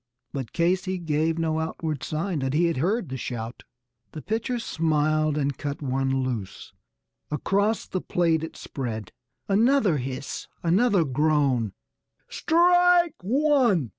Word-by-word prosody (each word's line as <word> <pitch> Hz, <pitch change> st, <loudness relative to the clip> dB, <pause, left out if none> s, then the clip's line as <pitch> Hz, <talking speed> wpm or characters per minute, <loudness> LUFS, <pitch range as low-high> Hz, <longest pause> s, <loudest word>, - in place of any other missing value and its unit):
But 130 Hz, -5 st, -4 dB
Casey 185 Hz, +2 st, 0 dB
gave 160 Hz, -1 st, 0 dB
no 160 Hz, -1 st, 0 dB
outward 160 Hz, -2 st, -3 dB
sign 165 Hz, +2 st, -2 dB
that 135 Hz, +1 st, -1 dB
he 170 Hz, +3 st, +3 dB
had 170 Hz, -4 st, 0 dB
heard 185 Hz, -, 0 dB
the 130 Hz, -, -4 dB
shout. 120 Hz, -1 st, -5 dB, 0.5 s
The 155 Hz, -, -7 dB
pitcher 225 Hz, +3 st, -1 dB
smiled 155 Hz, -6 st, +1 dB
and 140 Hz, -2 st, 0 dB
cut 145 Hz, +1 st, -5 dB
one 135 Hz, 0 st, 0 dB
loose; 115 Hz, -7 st, -5 dB, 0.6 s
across 200 Hz, +8 st, 0 dB
the 185 Hz, -, -3 dB
plate 165 Hz, -3 st, +1 dB
it 160 Hz, -, -7 dB
spread; 110 Hz, -, -5 dB, 0.4 s
Another 215 Hz, -, +3 dB
hiss, 130 Hz, +2 st, -5 dB, 0.2 s
another 190 Hz, +1 st, +3 dB
groan 140 Hz, -5 st, +1 dB, 0.5 s
"Strike 355 Hz, 0 st, +4 dB
one!" 245 Hz, -, +2 dB
160 Hz, 130 wpm, -25 LUFS, 135-200 Hz, 0.6 s, Strike